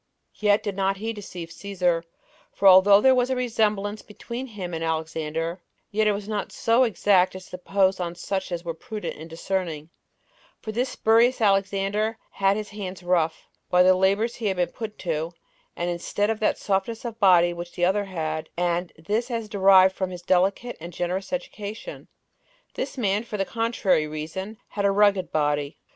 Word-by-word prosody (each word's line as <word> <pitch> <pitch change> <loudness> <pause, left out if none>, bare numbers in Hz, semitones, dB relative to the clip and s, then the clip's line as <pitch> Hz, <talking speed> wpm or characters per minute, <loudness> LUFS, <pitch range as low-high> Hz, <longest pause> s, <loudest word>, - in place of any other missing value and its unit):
Yet 210 0 +3
did 205 -3 -3
not 195 0 0
he 225 +3 -3
deceive 180 -5 -8
Cæsar; 180 -4 -1 0.5
for 200 - +2
although 195 +2 +8
there 265 +2 +6
was 250 0 +2
a 260 - +1
resemblance 215 -4 0
between 235 +4 -7
him 190 -7 -6
and 165 0 -3
Alexander, 160 +1 -3 0.3
yet 215 0 +2
was 205 0 -4
it 215 - -7
not 210 - -3
so 235 +3 +3
exact 195 -5 +2
as 185 0 -10
to 180 - -5
impose 190 +1 +1
on 175 -1 -3
such 190 +2 -3
as 175 0 -4
were 165 - -2
prudent 210 +6 -6
in 160 - -9
discerning; 165 -2 -4 0.7
for 220 - -6
this 245 +4 -1
spurious 230 +2 +3
Alexander 200 +1 +1
had 195 +1 +2
his 215 -1 -5
hands 190 -3 -7
rough, 170 -3 0 0.2
by 180 0 +5
the 185 +1 +6
labors 200 +5 +2
he 225 - -2
had 190 -2 -1
been 175 -1 0
put 220 -2 -7
to 165 -1 -3 0.4
and 175 +1 -2
instead 205 +5 -1
of 220 - -3
that 215 - +1
softness 205 +4 -2
of 230 -1 -6
body 175 -4 +5
which 175 0 -8
the 175 - +1
other 200 +3 +1
had, 155 -4 -4
and 175 0 0
this 210 +10 -2
as 230 -3 -3
derived 190 -2 +5
from 190 -1 -2
his 180 -1 -8
delicate 195 +6 +1
and 170 +1 -8
generous 180 +3 -3
education, 220 - -6 0.7
this 270 +1 -4
man, 205 -3 +1
for 215 -2 -6
the 195 - 0
contrary 225 -9 +1
reason, 165 +8 -6
had 205 - -3
a 200 - +4
rugged 200 -2 +3
body. 145 -1 0
195 Hz, 185 wpm, -25 LUFS, 175-215 Hz, 0.7 s, although